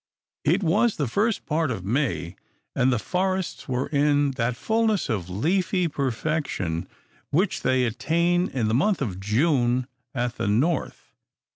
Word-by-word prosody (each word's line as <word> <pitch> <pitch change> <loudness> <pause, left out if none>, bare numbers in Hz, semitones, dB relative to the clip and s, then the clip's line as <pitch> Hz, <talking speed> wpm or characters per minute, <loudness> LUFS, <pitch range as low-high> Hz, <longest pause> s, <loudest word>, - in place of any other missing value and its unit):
It 175 +7 +2
was 190 +7 +3
the 145 - -1
first 210 - 0
part 160 -1 0
of 100 -7 -4
May; 100 - -1 0.4
and 130 +1 +3
the 125 - +2
forests 185 - -2
were 130 +1 0
in 145 -1 +2
that 120 -1 -1
fulness 220 - +1
of 95 -6 -2
leafy 180 - +1
perfection 135 - -2 0.4
which 180 +7 +1
they 130 -1 +2
attain 170 - +1
in 120 -5 -1
the 110 - 0
month 165 - +2
of 95 -7 -4
June 120 +3 +2 0.3
at 120 -1 -2
the - - -1
North. 135 +11 0
140 Hz, 145 wpm, -25 LUFS, 115-175 Hz, 0.4 s, was